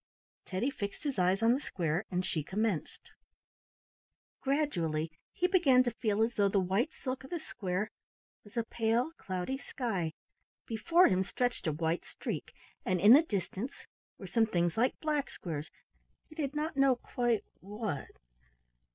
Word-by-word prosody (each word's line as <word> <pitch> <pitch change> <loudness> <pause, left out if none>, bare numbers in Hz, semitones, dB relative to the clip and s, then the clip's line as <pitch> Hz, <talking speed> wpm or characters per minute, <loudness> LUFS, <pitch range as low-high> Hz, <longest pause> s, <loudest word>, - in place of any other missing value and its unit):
Teddy 200 +9 -1
fixed 200 0 -5
his 275 -8 -1
eyes 185 +4 +3
on 230 +1 +6
the 260 - +1
square 175 - -1
and 180 0 -1
she 155 - -1
commenced. 205 0 -2 1.3
Gradually 170 - 0 0.2
he 360 - 0
began 315 -9 +5
to 240 - 0
feel 220 -2 +1
as 235 +2 0
though 200 -3 +3
the 195 - +3
white 195 - +1
silk 260 -1 -5
of 265 - -10
the 345 - -2
square 200 -7 -3 0.5
was 210 +3 -13
a 230 - +2
pale 230 +5 +1
cloudy 185 +8 -3
sky. 195 - -2 0.5
Before 335 +11 +4
him 185 0 +3
stretched 245 +1 -1
a - - +3
white 160 +2 -1
streak, - - -5 0.3
and 185 -1 +1
in 205 +6 +9
the 290 - +9
distance 215 - -4 0.3
were - - -9
some 225 -2 +2
things 175 -4 +1
like 245 +3 +1
black 300 -3 0
squares; 155 -2 -5 0.6
he - - -12
did 295 -3 -3
not 305 +1 -1
know 270 -1 +5
quite 240 -2 0 0.2
what. 205 -6 -4
220 Hz, 160 wpm, -32 LUFS, 185-265 Hz, 1.3 s, in